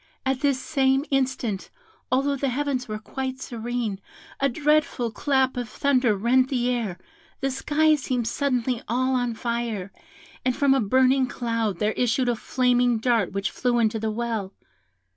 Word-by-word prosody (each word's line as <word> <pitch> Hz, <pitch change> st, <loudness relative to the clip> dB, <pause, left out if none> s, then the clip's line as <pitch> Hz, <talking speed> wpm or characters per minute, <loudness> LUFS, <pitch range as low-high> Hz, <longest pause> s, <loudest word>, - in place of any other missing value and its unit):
at 265 Hz, -1 st, 0 dB
this 280 Hz, -2 st, +1 dB
same 270 Hz, -1 st, +1 dB
instant, 255 Hz, -7 st, -1 dB, 0.4 s
although 275 Hz, +2 st, +2 dB
the 275 Hz, 0 st, -1 dB
heavens 265 Hz, -1 st, -1 dB
were 215 Hz, -1 st, -4 dB
quite 260 Hz, +4 st, -5 dB
serene, 235 Hz, -4 st, -3 dB, 0.4 s
a 275 Hz, -, +2 dB
dreadful 295 Hz, -3 st, +1 dB
clap 265 Hz, +2 st, +1 dB
of 245 Hz, -2 st, -4 dB
thunder 255 Hz, -5 st, +2 dB
rent 255 Hz, +5 st, +3 dB
the 250 Hz, -2 st, +1 dB
air, 225 Hz, -7 st, -2 dB, 0.4 s
the 270 Hz, -1 st, -1 dB
sky 305 Hz, +4 st, +2 dB
seemed 255 Hz, -5 st, -1 dB
suddenly 250 Hz, -2 st, 0 dB
all 255 Hz, +3 st, +1 dB
on 245 Hz, -2 st, 0 dB
fire, 230 Hz, -4 st, -3 dB, 0.5 s
and 255 Hz, -1 st, +1 dB
from 280 Hz, -2 st, +3 dB
a 270 Hz, -, +2 dB
burning 260 Hz, +4 st, +3 dB
cloud 230 Hz, -6 st, -2 dB
there 210 Hz, +3 st, +1 dB
issued 245 Hz, +2 st, +1 dB
a 240 Hz, -, +1 dB
flaming 245 Hz, 0 st, +2 dB
dart 225 Hz, -4 st, +1 dB
which 195 Hz, 0 st, -2 dB
flew 245 Hz, -1 st, 0 dB
into 220 Hz, -1 st, +1 dB
the 220 Hz, 0 st, -1 dB
well. 220 Hz, -3 st, -3 dB
250 Hz, 160 wpm, -25 LUFS, 230-265 Hz, 0.5 s, rent